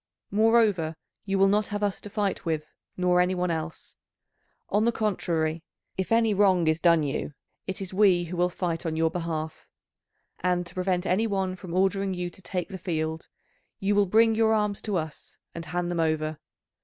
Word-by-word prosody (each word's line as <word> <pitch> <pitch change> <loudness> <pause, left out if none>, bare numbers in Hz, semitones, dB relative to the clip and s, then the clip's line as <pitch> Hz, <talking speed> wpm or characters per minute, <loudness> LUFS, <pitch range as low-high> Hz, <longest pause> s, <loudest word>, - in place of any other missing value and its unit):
Moreover 210 -6 +3 0.3
you 195 -1 0
will 195 0 +5
not 210 +2 +2
have 205 0 -3
us 200 -2 -1
to 205 - -8
fight 205 -1 -1
with, 155 -2 -3 0.2
nor 180 -1 +3
any 180 +1 +1
one 180 -1 0
else. 160 0 -5 0.7
On 210 - +2
the 235 - +4
contrary, 170 -7 -1 0.3
if 190 +2 -3
any 225 -1 +4
wrong 190 -4 +4
is 160 0 +2
done 170 -2 +4
you, 145 0 -3 0.3
it 190 +1 -4
is 190 -1 -5
we 185 -3 +4
who 175 +1 -6
will 180 +1 +2
fight 175 -2 -3
on 165 -2 -2
your 160 0 +2
behalf. 160 -2 -4 0.7
And 180 0 0
to - - -12
prevent 185 0 0
any 205 +5 +2
one 190 -3 -1
from 180 -2 -7
ordering 195 0 +1
you 180 0 -3
to 190 - -14
take 180 -1 -3
the 190 -2 -7
field, 160 -2 -3 0.5
you 200 +1 +1
will 205 -1 +3
bring 225 +4 +5
your 220 0 +3
arms 210 -2 0
to 210 -3 -2
us 155 -2 -6 0.2
and 165 -1 -6
hand 175 +2 -2
them 175 - -2
over. 155 -1 0
180 Hz, 190 wpm, -27 LUFS, 165-200 Hz, 0.7 s, will